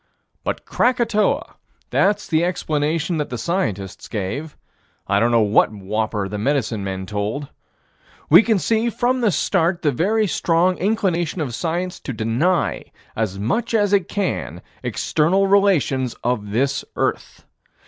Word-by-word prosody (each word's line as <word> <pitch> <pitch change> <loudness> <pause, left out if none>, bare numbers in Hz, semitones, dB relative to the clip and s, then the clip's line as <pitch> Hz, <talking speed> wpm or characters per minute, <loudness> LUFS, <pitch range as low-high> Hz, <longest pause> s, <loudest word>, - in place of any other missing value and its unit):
But - - -3
Krakatoa: 235 -4 +1 0.3
that's 205 +1 +2
the 160 0 +2
explanation 160 -1 -1
that 150 - -2
the 125 - -4
scientists 105 - -3
gave. 125 +9 -4 0.5
I 100 0 +2
don't 115 +3 +3
know 115 -1 +4
what 105 +1 +3
whopper 105 0 -2
the 105 +1 -5
medicine 115 -4 0
men 95 -1 -4
told. 105 +8 -3 0.8
We 170 +6 +8 0.2
see, 225 +4 +1
from 245 +2 0
the 225 - +3
start, 175 -2 +1
the 150 - +3
very 210 - +1
strong 180 -1 +1
inclination 185 -4 0
of 140 -6 -3
science 175 +6 -2
to - - -5
deny, 135 +11 0 0.3
as 105 -4 -2
much 225 - -1
as 205 -2 +2
it 195 -3 +2
can, 200 -3 -3 0.2
external 180 +6 +1
relations 170 - +2
of 110 -4 -1
this 135 +6 0
earth. - - -2
160 Hz, 140 wpm, -21 LUFS, -, 0.8 s, We